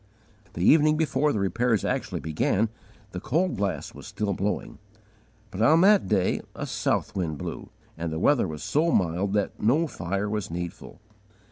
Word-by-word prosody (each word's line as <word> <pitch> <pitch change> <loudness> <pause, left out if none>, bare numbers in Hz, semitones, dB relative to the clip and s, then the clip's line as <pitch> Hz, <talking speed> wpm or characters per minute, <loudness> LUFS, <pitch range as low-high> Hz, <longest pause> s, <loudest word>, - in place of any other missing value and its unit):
The 85 - -2
evening 155 0 +5
before 150 -1 +1
the - - -1
repairs 115 +2 +1
actually - - -2
began, 95 +7 0 0.4
the 90 - -5
cold 170 - 0
blast 100 -2 -3
was - - -11
still 105 -2 -2
blowing; 100 +3 -3 0.7
but 100 0 -5
_on 160 +9 +5
that 205 0 +5
day 95 -3 +1
a - - -4
south - - -1
wind 85 -6 -2
blew, - - -6 0.3
and 85 -1 -3
the 80 - -3
weather 130 - +3
was 75 -1 -7
so 160 +3 +1
mild 90 - +1
that 105 -1 -1
no 135 +10 +3
fire 100 - -3
was 105 -1 -3
needful! 85 +3 -7
105 Hz, 165 wpm, -26 LUFS, 90-145 Hz, 0.7 s, evening